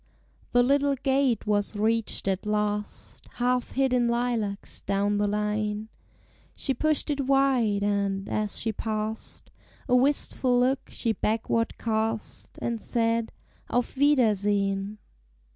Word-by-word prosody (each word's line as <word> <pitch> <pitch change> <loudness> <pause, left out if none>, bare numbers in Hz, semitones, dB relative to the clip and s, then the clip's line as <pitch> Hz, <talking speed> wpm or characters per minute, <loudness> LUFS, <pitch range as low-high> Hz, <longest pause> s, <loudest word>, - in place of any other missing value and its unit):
The 245 0 +5
little 280 +2 +3
gate 265 -3 +1
was 205 0 0
reached 220 0 0
at 195 +1 -1
last, 210 0 -3
Half 250 0 0
hid 265 -1 +2
in 245 -1 +3
lilacs 235 -4 -2
down 205 +1 0
the 205 - +2
lane; 210 +1 -1 0.7
She 270 - -1
pushed 305 +3 0
it 280 -2 -2
wide, 260 -7 +3
and, 200 -1 0
as 210 -1 -2
she 225 -1 -1
past, 215 0 -4 0.4
A 250 - +3
wistful 255 -1 +2
look 260 +2 +1
she 230 - -1
backward 225 +2 -1
cast, 220 -1 -3
And 230 -2 -2
said, 230 -1 0 0.4
"Auf 245 +2 -1
wiedersehen!" 205 -7 +2
225 Hz, 125 wpm, -27 LUFS, 210-250 Hz, 0.7 s, The